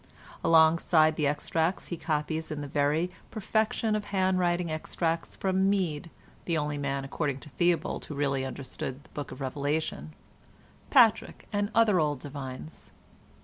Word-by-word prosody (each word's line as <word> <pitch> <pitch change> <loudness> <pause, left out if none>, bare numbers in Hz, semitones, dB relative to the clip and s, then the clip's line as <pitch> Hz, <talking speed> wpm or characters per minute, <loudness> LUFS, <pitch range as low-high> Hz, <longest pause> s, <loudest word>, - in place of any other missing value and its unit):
Alongside 160 -1 +5
the 150 -2 +1
extracts 160 +4 -1
he 175 - -2
copies 155 0 -2
in 155 -1 -4
the 145 - -5
very 150 +5 +1 0.2
perfection 220 +1 0
of 210 -1 -2
hand 190 -2 +1
writing 175 -1 +1
extracts 165 +1 -2
from 190 0 +1
Mede 170 -5 -1 0.4
(the 170 -2 0
only 150 -1 -2
man, 140 -1 -2
according 140 -1 -2
to - - -10
Theobald, 175 +3 0
who 150 - -7
really 140 -2 0
understood 135 0 -6
the - - -21
Book 145 - -6
of - - -9
Revelation), 145 +4 -2 0.8
Patrick, 240 -6 +4
and 205 0 0
other 220 -5 +5
old 150 -3 0
divines. 140 +2 -8
160 Hz, 145 wpm, -28 LUFS, 145-180 Hz, 0.8 s, Alongside